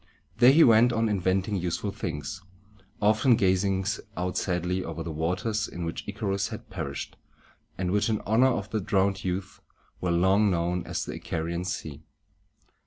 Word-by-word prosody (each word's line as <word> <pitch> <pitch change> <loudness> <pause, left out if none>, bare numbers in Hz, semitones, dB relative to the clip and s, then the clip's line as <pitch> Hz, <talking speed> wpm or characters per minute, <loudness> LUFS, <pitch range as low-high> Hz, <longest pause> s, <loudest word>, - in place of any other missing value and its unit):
There 125 +2 +8
he 160 +4 +7
went 115 +1 +6
on 115 -1 +1
inventing 95 0 0
useful 90 +3 -2
things, 80 +2 -5 0.6
often 110 +4 +4
gazing 95 -2 +1 0.3
out 90 +1 -2
sadly 90 0 -1
over 85 - -5
the 80 - -5
waters 90 +8 -1
in 85 -1 -6
which 80 - -5
Icarus 100 -2 -2
had 110 -2 -9
perished, 75 -7 -5 0.6
and 90 -1 -1
which, 105 +2 +1
in 110 -2 +1
honor 115 +5 +3
of 110 -4 -3
the 110 - -1
drowned 100 +1 +1
youth, 95 0 -4 0.4
were 90 - -2
long 95 +5 +3
known 90 0 0
as - - -3
the - - -5
I - - -7
ca´ri 80 +1 -3
an 85 +1 -3
Sea. 80 -5 -5
95 Hz, 170 wpm, -27 LUFS, 90-105 Hz, 0.6 s, There